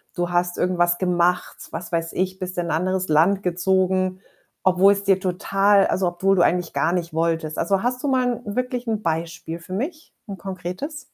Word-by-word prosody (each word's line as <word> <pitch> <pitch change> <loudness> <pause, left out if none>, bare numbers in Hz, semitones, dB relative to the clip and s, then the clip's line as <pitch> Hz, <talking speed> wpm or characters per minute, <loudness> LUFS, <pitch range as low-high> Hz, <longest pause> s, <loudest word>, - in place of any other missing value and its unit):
du 175 -1 -1
hast 175 0 0
irgendwas 175 -1 +2
gemacht, 180 -1 +1
was 175 - -6
weiß 165 -1 -2
ich, 185 0 -2
bist 185 0 -5
in 175 -1 -1
'n - - -2
anderes 185 +3 0
Land 175 +6 +3
gezogen, 185 +1 +1 0.4
obwohl 190 +2 +5
es 200 0 -4
dir 195 -1 +3
total 195 +2 +2
also, 185 0 0
obwohl 190 +3 +1
du - - +4
eigentlich 175 -1 +1
gar 140 +5 +1
nicht 170 -3 -2
wolltest. 160 -1 -1
Also, 195 0 +1
hast 250 +1 -1
du - - 0
mal 250 -3 +1
wirklich 250 +3 -3
'n 220 -2 -1
Beispiel 165 -1 -3
für 170 +2 -9
mich, 305 - -5
'n 200 -2 -6
konkretes? 190 - -6
185 Hz, 190 wpm, -22 LUFS, 175-195 Hz, 0.4 s, obwohl